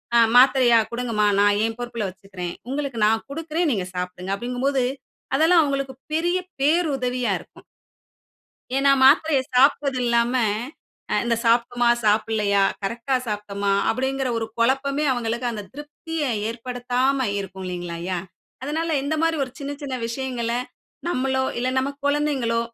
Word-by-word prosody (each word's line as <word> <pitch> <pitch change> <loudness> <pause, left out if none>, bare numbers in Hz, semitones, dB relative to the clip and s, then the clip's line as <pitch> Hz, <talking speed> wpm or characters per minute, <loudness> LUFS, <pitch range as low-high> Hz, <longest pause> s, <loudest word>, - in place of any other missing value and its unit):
அ 235 - +7 0.2
மாத்திரையா! 250 -3 +6
கொடுங்கம்மா. 235 -3 0 0.2
நான் 205 0 +3
என் 225 0 -3
பொறுப்புல 235 -4 -3
வச்சுக்கிறேன். 185 -2 -7 0.2
உங்களுக்கு 275 -4 -3
நான் 220 +1 +1
கொடுக்கிறேன். 325 +2 -1
நீங்க 190 -3 -2
சாப்பிடுங்க. 180 +1 -4
அப்படிங்கம்போது 250 +4 -1 0.5
அதெல்லாம் 325 +3 +5
அவுங்களுக்கு 275 -2 -2 0.2
பெரிய 345 +3 +1 0.2
பேருதவியா 275 -6 +1
இருக்கும். - - -17 1.1
ஏன்னா 275 +1 +4
மாத்திரைய 290 +1 +5
சாப்ட்டது 275 0 +3
இல்லாம, 235 +1 +2 0.8
அ - - +2
இந்த 235 -1 +1
சாப்ட்டமா 240 +1 +2
சாப்டலையா? 210 -2 +2 0.2
கரெக்ட்டா 235 +6 -2
சாப்ட்டமா? 205 -2 -2 0.2
அப்படிங்குற 265 +2 -1
ஒரு 225 - -2
கொழப்பமே 275 +4 +1
அவங்களுக்கு 235 0 -2
அந்த 215 -3 -5
திருப்தியை 295 +1 -5 0.2
ஏற்படுத்தாம 250 +2 -1
இருக்கும். 190 -1 -6
இல்லிங்களாயா? 175 0 -4 0.5
அதனால 320 +4 -2
இந்த 285 +3 -1
மாரி 330 -1 +2
ஒரு 255 - -11
சின்ன 285 0 -5
சின்ன 270 -2 -4
விஷயங்கள, 240 -1 -3 0.6
நம்மளோ, 265 -3 0 0.2
இல்ல 250 +1 0
நம்ம 270 +2 0 0.2
கொழந்தைங்களோ, 285 -6 +1
250 Hz, 125 wpm, -23 LUFS, 225-275 Hz, 1.1 s, அ